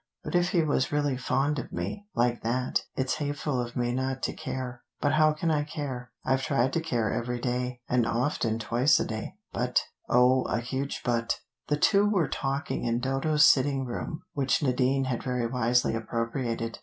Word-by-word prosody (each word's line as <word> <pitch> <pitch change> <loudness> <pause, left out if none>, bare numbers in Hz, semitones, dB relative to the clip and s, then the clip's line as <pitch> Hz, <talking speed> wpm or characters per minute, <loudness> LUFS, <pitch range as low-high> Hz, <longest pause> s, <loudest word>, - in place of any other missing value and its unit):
But - - -5
if 175 0 +3
he 170 -3 +2
was 145 -4 +1
really 145 -2 +1
fond 135 +3 0
of 125 - -7
me, 205 0 -4
like 120 0 +1
that, 125 +3 0
it's 130 +2 0
hateful 145 -3 -1
of 120 -1 -6
me 120 -1 0
not 130 +1 -2
to - - 0
care. 130 -4 -5 0.2
But 145 - +2
how 155 0 +5
can 160 +2 -1
I 150 -1 +2
care? 140 -4 -5 0.2
I've 130 0 +2
tried 135 -1 +1
to 165 - +1
care 120 -9 0
every 120 +1 -2
day, 125 0 -2
and 120 -2 +2
often 115 -1 0
twice 120 +5 +3
a - - 0
day, 110 -1 -5 0.2
but - - +1 0.3
oh, 125 +1 +5
a 110 - 0
huge 130 +3 -3
'but.'" 115 -1 0 0.3
The 150 - +1
two 200 +6 +4
were 185 -8 +2
talking 135 +2 -2
in 120 0 +1
Dodo's 135 +4 +3
sitting 135 0 +4
room, 155 +7 -5
which 145 +4 +1
Nadine 130 0 +2
had 130 -3 -2
very 125 -2 -1
wisely 125 0 +2
appropriated. 115 0 -2
130 Hz, 185 wpm, -28 LUFS, 120-145 Hz, 0.3 s, how